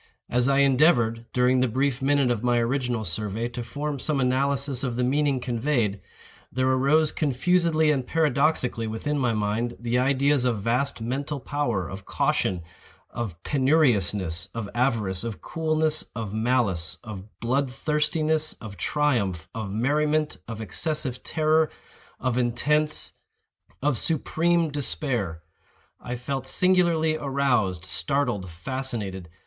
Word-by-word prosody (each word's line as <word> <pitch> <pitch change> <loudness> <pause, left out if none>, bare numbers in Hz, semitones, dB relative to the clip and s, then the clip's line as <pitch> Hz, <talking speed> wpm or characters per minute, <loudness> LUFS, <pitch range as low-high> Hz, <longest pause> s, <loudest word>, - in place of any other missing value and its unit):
As 125 +1 +2
I 135 0 +4
endeavored, 125 -5 +3
during 125 +1 +3
the 130 - +3
brief 130 +2 0
minute 135 -2 +2
of 115 -3 -1
my 120 0 +2
original 120 -1 0
survey, 105 +5 -2
to 120 0 -5
form 145 +4 -4
some 145 +1 0
analysis 135 +1 +1
of 125 -3 -2
the 125 - 0
meaning 140 +1 +1
conveyed, 120 -5 -1 0.5
there 130 +1 0
arose 140 +4 +3
confusedly 160 +2 +2
and 130 -4 -1
paradoxically 145 -6 +1
within 140 +7 -2
my 125 -3 +2
mind, 110 +3 -1
the 120 +1 0
ideas 140 +1 +2
of 115 -5 0
vast 125 +3 0
mental 140 +5 -3
power, 120 - -2
of 95 +2 -8
caution, 90 -3 0 0.5
of 100 -9 -5
penuriousness, 105 - +2
of 115 -3 -3
avarice, 115 -7 +1
of 115 -3 -5
coolness, 155 -1 +1
of 110 -3 -4
malice, 110 -8 +1
of 105 -2 -10
blood 130 +3 0
thirstiness, 155 +2 0
of 105 -4 -10
triumph, 100 - 0
of 110 -3 -4
merriment, 150 +7 +1
of 115 -1 -6
excessive 135 +1 -1
terror, 155 0 +2 0.5
of 125 -1 0
intense—of 150 +2 -2
supreme 165 +1 +1
despair. 125 - -2 0.6
I 125 - -5
felt 130 +2 -4
singularly 170 -4 +2
aroused, 125 - 0
startled, 120 -4 -1
fascinated. 100 -2 -4
130 Hz, 130 wpm, -25 LUFS, 115-145 Hz, 0.6 s, I